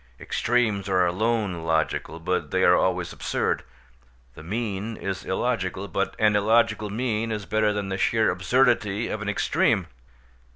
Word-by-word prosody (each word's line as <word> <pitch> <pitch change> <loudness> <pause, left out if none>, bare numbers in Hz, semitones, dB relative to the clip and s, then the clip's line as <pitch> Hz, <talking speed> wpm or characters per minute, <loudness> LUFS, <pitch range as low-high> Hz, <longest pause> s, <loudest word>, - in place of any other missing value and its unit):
Extremes 110 -5 0
are 90 -1 +3
alone 100 -1 -1
logical, 80 0 -1
but 90 +3 -2
they 95 0 +1
are 90 - +6
always 90 -2 0
absurd; - - -1 0.7
the - - -12
mean 105 +3 -3
is 95 -1 -4
illogical, 95 -3 -2
but 100 0 -2
an 105 -1 +3
illogical 110 0 +2
mean 115 0 -1
is 105 -2 -3
better 110 0 +1
than 105 -1 -3
the 95 0 -3
sheer 110 +1 +2
absurdity 110 +1 +1
of 110 - -4
an 105 - -2
extreme. 105 - +1
105 Hz, 150 wpm, -25 LUFS, 95-110 Hz, 0.7 s, are